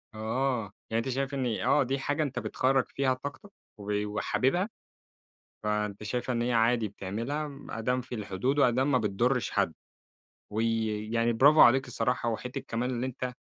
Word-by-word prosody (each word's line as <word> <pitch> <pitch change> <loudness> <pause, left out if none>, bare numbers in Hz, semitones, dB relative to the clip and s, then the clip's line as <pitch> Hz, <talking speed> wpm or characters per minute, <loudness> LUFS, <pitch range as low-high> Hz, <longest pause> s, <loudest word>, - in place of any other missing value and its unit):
آه، 115 -1 -1 0.2
يعني 115 +1 +1
أنت - - -2
شايف 135 +2 -2
إن 135 -2 -1
آه 140 +2 +3
دي 135 +2 -1
حاجة 145 +3 0
أنت 140 -3 -3
بتخرَّج 130 0 +1
فيها 130 -2 +1
طاقتك، 145 +10 -8 0.3
و 105 0 -2
وحاببها، 135 - 0 0.9
فأنت 105 -1 -1
شايف 125 +4 -2
إن 120 -1 0
هي 120 0 0
عادي 115 -1 +3
بتعملها، 115 +11 -4
م 140 -1 -11
أدام 125 +3 -1
في 125 0 -7
الحدود، 110 +7 -1
وأدام 130 +2 +3
ما 130 - +5
بتضرش 115 +2 0
حد، 95 -5 +1 0.8
وي 115 0 +1 0.3
يعني 115 0 +2
برافو 145 +7 +6
عليك 130 +2 +7
الصراحة، 120 0 0
وحتّة 125 +4 -3
كمان 120 +3 -1
اللي 125 +1 -2
أنت، 125 -1 -4
125 Hz, 165 wpm, -29 LUFS, 110-135 Hz, 0.9 s, عليك